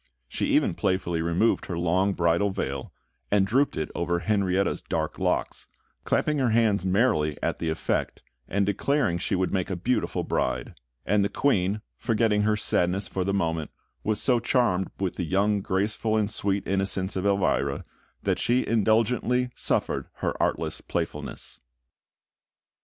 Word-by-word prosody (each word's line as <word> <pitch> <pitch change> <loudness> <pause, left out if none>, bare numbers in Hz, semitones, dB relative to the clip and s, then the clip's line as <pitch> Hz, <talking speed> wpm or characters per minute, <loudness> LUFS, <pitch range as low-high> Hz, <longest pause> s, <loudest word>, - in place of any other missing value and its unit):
She - - -2
even - - +3
playfully 85 -3 0
removed 85 +7 +1
her 85 - -3
long 90 +3 +2
bridal 85 +3 +2
veil, 70 -8 -4 0.4
and 100 -1 +3
drooped 130 +8 +1
it 80 - -3
over 85 0 -1
Henrietta's 100 -1 +1
dark - - -3
locks, - - -1 0.4
clapping 150 -1 +1
her 130 -3 +2
hands 110 -4 +2
merrily 95 - +2
at - - -1
the 85 - -1
effect, 80 - -2 0.2
and 100 +1 +1
declaring 105 -1 +1
she - - -1
would 95 0 0
make 95 -1 0
a 95 - -1
beautiful 120 +9 -1
bride; - - -1 0.3
and 105 +1 +3
the 100 - +1
Queen, 100 -4 +1 0.2
forgetting 110 -2 +2
her 105 0 +2
sadness 95 -1 +1
for 95 - -2
the 100 - -1
moment, 80 -5 -1 0.3
was 110 -1 0
so 125 -3 +3
charmed 115 -7 +1
with 95 -2 -2
the 90 - -1
youthful 100 +4 +2
grace 95 +3 -1
and 110 -2 +1
sweet 100 -2 -1
innocence 95 0 0
of 95 - -1
Elvira, 95 -8 +1 0.4
that - - 0
she 125 +2 +2
indulgently 115 +3 +2
suffered - - -1
her - - -2
artless - - -1
playfulness. - - -5
100 Hz, 150 wpm, -26 LUFS, 90-110 Hz, 0.4 s, even